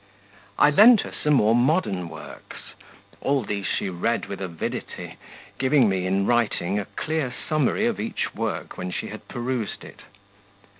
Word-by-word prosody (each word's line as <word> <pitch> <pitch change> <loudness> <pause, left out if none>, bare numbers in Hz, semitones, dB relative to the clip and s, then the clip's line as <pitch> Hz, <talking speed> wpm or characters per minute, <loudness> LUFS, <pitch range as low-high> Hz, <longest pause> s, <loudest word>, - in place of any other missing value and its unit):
I 150 - +6
lent 215 +7 +8
her - - -7
some 150 -1 +1
more 110 -3 +4
modern 120 - +1
works; - - -11 0.5
all 140 -2 +1
these 100 -1 -3
she - - -1
read 95 +6 -1
with 100 -1 -7
avidity, 85 -4 -5 0.4
giving 130 -2 +4
me, 95 -2 0
in 95 +1 +1
writing, 105 -5 +1
a 100 - -4
clear 155 -5 -1 0.2
summary 155 - +1
of 235 -2 0
each 225 - -3
work 115 -2 -4
when 90 - -3
she - - -4
had - - -10
perused 120 -2 -3
it. - - -13
120 Hz, 155 wpm, -24 LUFS, 100-150 Hz, 0.5 s, lent